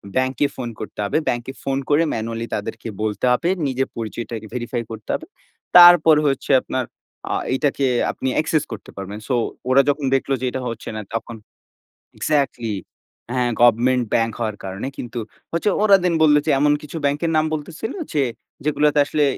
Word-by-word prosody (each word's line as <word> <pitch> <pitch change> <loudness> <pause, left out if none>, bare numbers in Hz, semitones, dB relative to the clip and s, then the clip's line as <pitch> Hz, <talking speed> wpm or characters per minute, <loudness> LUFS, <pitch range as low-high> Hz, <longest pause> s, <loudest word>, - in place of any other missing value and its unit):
ব্যাংকে 130 +1 +1
ফোন 125 -2 -4
করতে 110 - -8
হবে। 100 - 0
ব্যাংকে 120 0 -1
ফোন 135 0 -1
করে 150 +3 +4
manually 115 +1 -3
তাদেরকে 110 +2 -5 0.2
বলতে 105 +1 -1
হবে। 165 +8 +1 0.2
নিজের 135 0 -1
পরিচয়টাকে 115 +1 -5
আগে 110 0 -9
verify 120 0 -2
করতে 110 -1 -9
হবে। 320 - -3 0.5
তারপর 175 -3 +9
হচ্ছে 135 0 -1
আপনার 130 - -2 0.5
আ - - +1 0.2
এটাকে 140 0 0 0.3
আপনি 130 - -4
accesss 155 -1 0
করতে 110 - -8
পারবেন। 100 +2 -6
সো 130 - +1 0.3
ওরা 130 +2 +6
যখন 145 0 0
দেখলো 135 +1 0
যে - - -1
এটা 130 - -4
হচ্ছে 115 -1 -6
না, 110 - -3
তখন 115 0 -4 0.8
এক্সাক্টলি, 135 -7 0 0.6
হ্যাঁ। 125 -1 +1
গভমেন্ট 120 +2 +4
ব্যাংক 115 0 +2
হওয়ার 110 -3 -2
কারণে 95 +6 -5
কিন্তু 120 0 -5 0.3
হচ্ছে 170 +5 +1
ওরা 205 -2 +7
দেন 180 -1 +2
বললো 150 -1 +6
যে, 160 - +2
এমন 145 0 +4
কিছু 150 +2 -7
ব্যাংকের 150 +4 0
নাম 155 - +3
বলতেছিল 160 - -5 0.2
যে, 145 -3 +2 0.4
যেগুলোতে 150 0 +2
আসলে 150 +1 +1
130 Hz, 170 wpm, -21 LUFS, 115-150 Hz, 0.8 s, তারপর